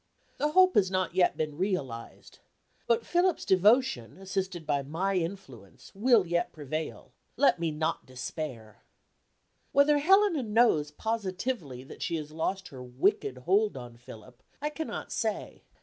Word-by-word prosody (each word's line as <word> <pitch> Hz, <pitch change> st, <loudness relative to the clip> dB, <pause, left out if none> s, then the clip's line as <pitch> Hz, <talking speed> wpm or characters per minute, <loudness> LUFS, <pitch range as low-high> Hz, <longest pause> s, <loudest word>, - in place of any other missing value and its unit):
The 300 Hz, +1 st, 0 dB
hope 370 Hz, +1 st, +6 dB
has 190 Hz, -3 st, +3 dB
not 185 Hz, -2 st, -1 dB
yet 185 Hz, -1 st, +2 dB
been 155 Hz, -1 st, -3 dB
realized. 145 Hz, -, -4 dB, 0.5 s
But 235 Hz, -1 st, +2 dB
Philip's 355 Hz, 0 st, +1 dB
devotion, 190 Hz, -, +3 dB
assisted 190 Hz, -3 st, -4 dB
by 140 Hz, -2 st, +1 dB
my 165 Hz, +8 st, -2 dB
influence, 165 Hz, -, -6 dB
will 225 Hz, 0 st, +4 dB
yet 175 Hz, 0 st, -1 dB
prevail. 155 Hz, +1 st, -6 dB, 0.3 s
Let 280 Hz, -10 st, +4 dB
me 170 Hz, -1 st, 0 dB
not 155 Hz, 0 st, -2 dB
despair. 125 Hz, -3 st, -7 dB, 0.9 s
Whether 290 Hz, +1 st, +5 dB
Helena 385 Hz, 0 st, +4 dB
knows 215 Hz, -10 st, +3 dB
positively 190 Hz, -, -3 dB
that 135 Hz, -, -12 dB
she 170 Hz, -, -1 dB
has 155 Hz, -2 st, -5 dB
lost 185 Hz, +5 st, -3 dB
her 130 Hz, -2 st, -10 dB
wicked 125 Hz, +1 st, 0 dB
hold 195 Hz, +6 st, +1 dB
on 120 Hz, -2 st, -9 dB
Philip 120 Hz, +1 st, -14 dB, 0.2 s
I 295 Hz, +1 st, -2 dB
cannot 320 Hz, +1 st, -5 dB
say. -, -, -3 dB
180 Hz, 140 wpm, -29 LUFS, 140-225 Hz, 0.9 s, hope